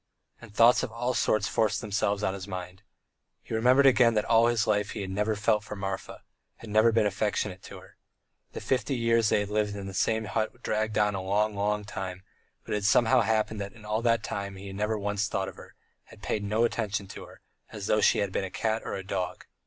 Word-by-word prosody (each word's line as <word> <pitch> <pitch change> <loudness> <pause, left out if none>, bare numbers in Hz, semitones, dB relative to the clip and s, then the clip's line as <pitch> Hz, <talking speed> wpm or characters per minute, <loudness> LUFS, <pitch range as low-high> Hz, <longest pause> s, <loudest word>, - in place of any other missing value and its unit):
And 120 -3 -12
thoughts 115 +3 +5
of - - -4
all 120 +2 -2
sorts 110 -2 +1
forced 110 -1 +1
themselves 105 -1 -1
on 95 - +1
his 95 0 -7
mind. 90 0 -7 0.6
He - - -8
remembered 125 +5 +4
again 120 -3 +5
that 105 - +1
all 115 0 +4
his 120 -2 +1
life 105 -1 0
he - - -5
had 95 -1 -5
never 105 +3 0
felt 105 0 +1
for 105 - -7
Marfa, 95 -1 -5 0.3
had 110 - -11
never 110 +2 +5
been 110 -1 +2
affectionate 100 -2 -1
to - - -10
her. - - -16 0.6
The - - -6
fifty 130 0 0
two - - -3
years 115 -1 +3
they - - +2
had 100 - -4
lived 105 -1 0
in 100 -1 -6
the 95 - -7
same 110 +3 0
hut 110 +2 -2
had - - -26
dragged 110 0 -1
on 105 -1 +2
a 95 - -3
long, 105 +3 0
long 105 +1 -1
time, 95 -2 -6 0.4
but - - -10
it 105 - +1
had 100 - -4
somehow 110 +3 +4
happened 110 -1 0
that 100 0 -6
in 110 -3 -15
all 105 +1 -1
that 115 -2 +2
time 100 -1 -4
he 95 +1 -10
had 95 -1 -7
never 105 +2 -1
once 105 0 -1
thought 95 - -2
of 95 - -8
her, - - -14 0.3
had - - -17
paid 105 - -2
no 105 +3 +1
attention 105 -4 -1
to - - -9
her, - - -16 0.3
as 105 -2 -6
though 105 +1 +2
she - - +4
had 100 -2 -1
been - - -1
a 95 - -4
cat 110 +4 -1
or - - -4
a 95 - -6
dog. 90 -2 -4
105 Hz, 245 wpm, -28 LUFS, 100-110 Hz, 0.6 s, thoughts